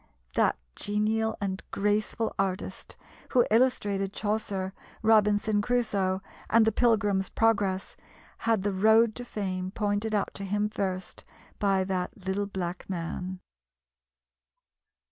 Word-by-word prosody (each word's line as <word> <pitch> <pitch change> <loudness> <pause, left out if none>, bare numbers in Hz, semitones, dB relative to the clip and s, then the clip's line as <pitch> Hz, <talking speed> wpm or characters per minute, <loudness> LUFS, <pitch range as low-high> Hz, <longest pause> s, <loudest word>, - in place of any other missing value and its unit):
That - - +2 0.2
genial 220 +2 0
and 190 -2 -2
graceful 210 +2 0
artist, 190 0 -2 0.4
who 245 -3 +5
illustrated 205 -5 +2
Chaucer, 205 -3 -2 0.3
Robinson 210 -1 +4
Crusoe, 205 -5 0 0.3
and 225 0 +5
The 220 - +3
Pilgrim's 205 -5 +2
Progress, 200 -4 +1 0.4
had 225 -4 +1
the 205 -1 0
road 220 +3 +5
to 245 - -5
fame 185 -5 -3
pointed 210 +1 -1
out 200 - 0
to 200 - -7
him 205 +2 0
first 190 -3 -4 0.4
by 195 -2 +2
that 185 +1 -3
little 200 +2 -1
black 185 -2 -5
man. 180 +1 -4
205 Hz, 115 wpm, -28 LUFS, 190-220 Hz, 0.4 s, who